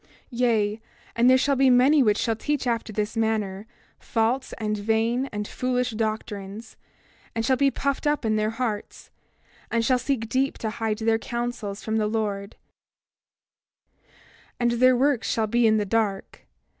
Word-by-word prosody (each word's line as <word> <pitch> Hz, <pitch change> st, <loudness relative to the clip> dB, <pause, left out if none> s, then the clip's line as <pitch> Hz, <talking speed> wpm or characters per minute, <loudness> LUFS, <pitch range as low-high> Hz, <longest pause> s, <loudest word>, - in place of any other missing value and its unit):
28:9 -, -, -32 dB, 0.2 s
Yea, 225 Hz, -3 st, +1 dB, 0.3 s
and 240 Hz, +2 st, +4 dB
there 260 Hz, -, +6 dB
shall 280 Hz, +2 st, +2 dB
be 265 Hz, 0 st, +4 dB
many 260 Hz, +4 st, +5 dB
which 210 Hz, -4 st, +3 dB
shall 225 Hz, -2 st, 0 dB
teach 290 Hz, +4 st, -2 dB
after 230 Hz, -2 st, -1 dB
this 210 Hz, +1 st, -2 dB
manner, 215 Hz, -3 st, -1 dB, 0.3 s
false 235 Hz, +4 st, -1 dB
and 215 Hz, -1 st, -1 dB
vain 225 Hz, +5 st, 0 dB
and 210 Hz, 0 st, -4 dB
foolish 250 Hz, -1 st, -1 dB
doctrines, 215 Hz, -1 st, -4 dB, 0.6 s
and 225 Hz, 0 st, -1 dB
shall 260 Hz, +1 st, +3 dB
be 275 Hz, +2 st, +3 dB
puffed 280 Hz, +2 st, -2 dB
up 295 Hz, -4 st, 0 dB
in 215 Hz, -1 st, +1 dB
their 215 Hz, 0 st, +1 dB
hearts, 225 Hz, -2 st, -4 dB, 0.6 s
and 230 Hz, 0 st, 0 dB
shall 255 Hz, 0 st, +3 dB
seek 245 Hz, -3 st, -2 dB
deep 265 Hz, +4 st, 0 dB
to 220 Hz, -, -3 dB
hide 225 Hz, -1 st, -2 dB
their 225 Hz, 0 st, +1 dB
counsels 235 Hz, -4 st, -4 dB
from 220 Hz, 0 st, -1 dB
the 215 Hz, -1 st, +1 dB
Lord; 210 Hz, -2 st, -3 dB, 2.0 s
and 240 Hz, -1 st, +2 dB
their 255 Hz, +1 st, +4 dB
works 270 Hz, -2 st, +1 dB
shall 225 Hz, -, +1 dB
be 235 Hz, +2 st, +2 dB
in 220 Hz, 0 st, +4 dB
the 210 Hz, -, 0 dB
dark. 205 Hz, -2 st, -2 dB
225 Hz, 165 wpm, -25 LUFS, 215-250 Hz, 2.0 s, there